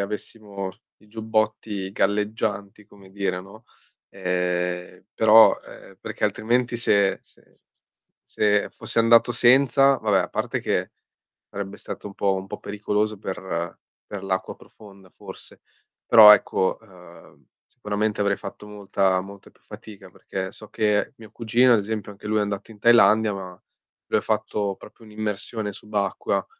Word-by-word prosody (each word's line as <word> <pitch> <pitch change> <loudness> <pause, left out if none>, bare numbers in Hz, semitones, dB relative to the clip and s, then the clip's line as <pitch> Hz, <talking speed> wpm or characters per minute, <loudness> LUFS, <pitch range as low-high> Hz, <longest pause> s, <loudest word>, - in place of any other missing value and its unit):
avessimo 100 -1 -6 0.3
i - - -21
giubbotti 110 -2 -2
galleggianti, 105 0 -2
come 100 -2 -18
dire, 95 -2 -3
no. 105 +4 -15 0.4
Ehm, 90 -1 -3
però 110 0 +6
ehm - - -15
perché - - -4
altrimenti 120 +2 0
se 100 -4 +2
se - - -28 0.7
se 105 -1 0
fossi - - -2
andato 115 +1 +4
senza, 135 +3 +4
vabbè 105 -3 +1
a 90 - -3
parte - - -2
che - - -2 0.6
sarebbe 100 0 -7
stato - - -8
un 100 - -12
po' 100 -1 +1
un 95 0 -6
po' - - -7
pericoloso 105 +1 -2
per 95 -3 -5 0.3
per 100 -2 -8
l'acqua 95 -1 -3
profonda 100 -3 -17
forse. - - -13 0.4
Però 105 -2 +10
ecco, 95 -2 0
ehm, 90 -5 -18 0.3
sicuramente 105 -2 -2
avrei 100 -1 +1
fatto 100 +1 -10
molta, 100 -2 0
molta 100 +1 -13
più - - -30
fatica 100 -3 -13
perché 95 +1 -6
so 110 - -10
che, 105 +6 0
mio 110 -2 -14
cugino 120 +2 +3
ad - - +5
esempio 105 0 -5
anche 100 +1 -11
lui 110 0 0
è - - +2
andato 100 +1 -4
in 105 - -15
Thailandia, 110 -1 +5
ma 95 -2 -9 0.5
lui - - +2
ha - - -9
fatto 100 -2 -2
proprio - - -16
un'immersione 105 0 -4
subacquea 105 -1 -2
105 Hz, 145 wpm, -23 LUFS, 95-110 Hz, 0.7 s, Però